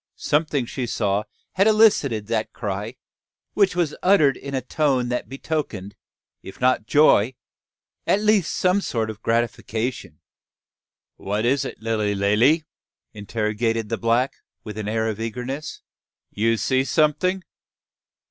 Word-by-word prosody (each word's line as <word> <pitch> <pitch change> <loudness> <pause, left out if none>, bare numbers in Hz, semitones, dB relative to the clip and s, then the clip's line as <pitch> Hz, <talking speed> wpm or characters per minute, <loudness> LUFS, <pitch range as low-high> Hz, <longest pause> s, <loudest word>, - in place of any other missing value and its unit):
Something 150 -3 0
she 125 +1 -4
saw 105 -2 0 0.3
had 195 +3 +2
elicited 200 - +4
that 110 0 -2
cry, 105 +1 -4 0.6
which 200 -3 +2
was 170 -4 0
uttered 180 -8 +4
in 140 0 -6
a - - +1
tone 130 -2 0
that 125 - -3
betokened, 135 - -4 0.5
if 95 - -11
not 125 -3 +2
joy, 130 -5 +4 0.7
at 200 - +3
least 210 -4 +2
some 185 +2 +2
sort 110 - -2
of 110 0 -13
gratification. 115 - -2 1.0
"Wha 105 +2 -2
is 130 +5 +1
it, - - -8
Lilly 110 -2 0
Lally?" 115 +11 +3 0.5
interrogated 110 +1 -2
the 115 - -1
black, 120 +3 +1 0.3
with 105 -2 -7
an 105 - -4
air 110 +1 0
of 110 -1 -3
eagerness; 125 +6 -5 0.5
"you 115 +2 +1
see 130 +5 +1
someting. 160 +6 +1
120 Hz, 130 wpm, -23 LUFS, 110-150 Hz, 1.0 s, elicited